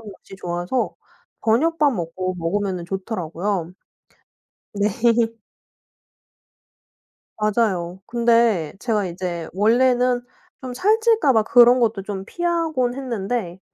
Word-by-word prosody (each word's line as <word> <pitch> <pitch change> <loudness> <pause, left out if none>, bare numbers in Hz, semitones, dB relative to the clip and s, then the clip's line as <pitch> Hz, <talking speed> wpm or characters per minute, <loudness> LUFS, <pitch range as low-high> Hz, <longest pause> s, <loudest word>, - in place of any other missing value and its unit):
것이 200 -2 -12
좋아서 175 +7 -2 0.5
저녁밥 295 +5 +3
먹고 185 0 -3
먹으면은 180 0 -2
좋더라고요. 185 -2 -3 1.0
네. 205 0 +1 2.5
맞아요. 195 -5 0
근데 230 -9 +2
제가 215 -5 0
이제 175 -2 -5
원래는 245 +4 +3 0.4
좀 255 -1 -6
살찔까 430 - +3
봐 220 -1 +3
그런 245 +2 +6
것도 220 -4 0
좀 195 -2 -5
피하곤 325 - -1
했는데 230 -7 -4
215 Hz, 210 characters per minute, -22 LUFS, 185-250 Hz, 2.5 s, 그런